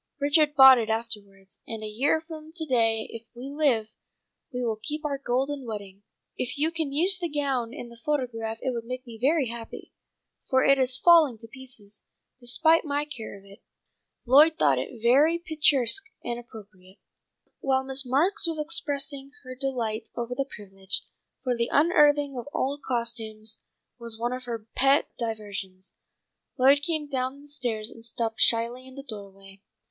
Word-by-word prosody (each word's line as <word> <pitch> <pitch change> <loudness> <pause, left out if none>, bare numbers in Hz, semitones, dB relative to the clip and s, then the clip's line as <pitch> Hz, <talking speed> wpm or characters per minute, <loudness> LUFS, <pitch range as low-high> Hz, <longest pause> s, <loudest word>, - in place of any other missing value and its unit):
Richard 295 +1 +3
bought 265 -2 +9
it 225 -1 -2
afterwards. 205 -4 -5
And 225 -1 -6
a - - -4
year 255 +9 +1
from 315 -1 -10
to 325 -2 -3
day 225 -5 +1
if 230 0 -9
we 255 +3 -7
live, 260 -8 +1 0.6
we 250 -1 -3
will 220 -2 -2
keep 300 +4 -4
our 280 -2 -2
golden 270 +2 -1
wedding. 200 -4 -7 0.3
If 250 +3 -3
you 310 +3 +1
can 320 -4 -2
use 360 +6 +4
the 345 -2 -2
gown 275 -6 -1
in 245 -3 -8
the 235 - -13
photograph 235 -6 -2
it 260 - 0
will 235 -2 -3
make 255 +3 -7
me 230 -2 -11
very 280 -1 +2
happy, 230 -1 -9 0.6
for 260 0 +3
it 275 0 +5
is 255 -1 +3
falling 320 -6 +6
to 225 +1 -10
pieces, 230 -5 -8 0.4
despite 315 +7 +3
my 290 -1 -1
care 235 -9 -7
of 195 - -18
it. 200 0 -16 0.6
Lloyd 295 +6 +6
thought 140 -3 +3
it 220 - -7
very 290 +8 +5
picturesque 310 - +2 0.2
and 240 0 -3
appropriate." 205 -6 -14 0.6
While 265 -1 +1
Miss 265 0 -1
Marks 330 +11 +2
was 325 -1 -2
expressing 285 -3 -2
her 255 -1 -8
delight 240 -4 -2
over 240 +1 -3
the 275 +2 -3
privilege, 195 -2 -4 0.4
for 250 -2 0
the 235 0 -1
unearthing 290 -3 +4
of 240 - -8
old 280 +2 -1
costumes 225 -3 -3 0.4
was 230 -1 -2
one 240 +2 -2
of 255 0 -6
her 230 -3 -5
pet 275 +3 +3
diversions, 200 -5 -5 0.6
Lloyd 275 +2 +5
came 310 -1 -1
down 270 0 -3
the - - -16
stairs 240 -6 -2
and 225 - -14
stopped 225 -1 -3
shyly 235 +3 +2
in 260 - -13
the 275 - -7
doorway. 195 -4 -11
255 Hz, 170 wpm, -26 LUFS, 225-285 Hz, 0.6 s, bought